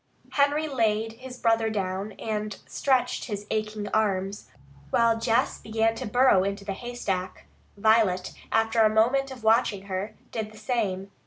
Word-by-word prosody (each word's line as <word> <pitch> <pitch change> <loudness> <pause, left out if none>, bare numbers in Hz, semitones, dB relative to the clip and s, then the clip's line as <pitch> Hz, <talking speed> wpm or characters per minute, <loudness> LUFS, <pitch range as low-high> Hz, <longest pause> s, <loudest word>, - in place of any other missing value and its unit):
Henry 290 +2 +2
laid 225 -5 0
his 250 +2 -10
brother 225 -2 +2
down 195 0 -3
and 210 -2 -4
stretched 265 -3 0
his 205 -2 -5
aching 215 -1 -2
arms, 200 -2 -1 0.4
while 230 -1 +3
Jess 230 +3 +1
began 225 0 +1
to 225 - -5
burrow 245 -4 +4
into 200 +1 -3
the 195 - -2
haystack. 195 -5 -4 0.3
Violet, 205 -4 +3 0.2
after 225 +1 +2
a 215 - +6
moment 245 +6 +2
of 255 -3 -10
watching 220 -3 +3
her, 200 +2 -4 0.2
did 215 -1 -4
the 215 - -14
same. 205 -4 -2
220 Hz, 150 wpm, -26 LUFS, 200-230 Hz, 0.4 s, a